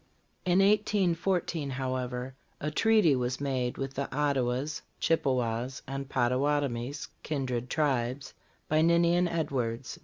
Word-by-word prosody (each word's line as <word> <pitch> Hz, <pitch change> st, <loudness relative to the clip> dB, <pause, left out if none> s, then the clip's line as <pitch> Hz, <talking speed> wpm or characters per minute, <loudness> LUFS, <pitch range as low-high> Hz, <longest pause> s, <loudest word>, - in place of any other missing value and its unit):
In 180 Hz, +1 st, +4 dB
1814, 185 Hz, -6 st, +1 dB
however, 130 Hz, -1 st, -3 dB, 0.3 s
a 150 Hz, -, -2 dB
treaty 215 Hz, -4 st, +4 dB
was 125 Hz, 0 st, -1 dB
made 130 Hz, -3 st, -1 dB
with 135 Hz, 0 st, -4 dB
the 140 Hz, 0 st, -3 dB
Ottawas, 140 Hz, 0 st, 0 dB, 0.2 s
Chippewas 130 Hz, -5 st, 0 dB
and 135 Hz, 0 st, -5 dB
Pottawatomies, 130 Hz, +1 st, 0 dB
kindred 125 Hz, -5 st, -2 dB
tribes, 135 Hz, -3 st, 0 dB, 0.3 s
by 155 Hz, 0 st, +3 dB
Ninian 170 Hz, +2 st, +4 dB
Edwards. 130 Hz, -8 st, -2 dB
135 Hz, 110 wpm, -29 LUFS, 125-160 Hz, 0.3 s, In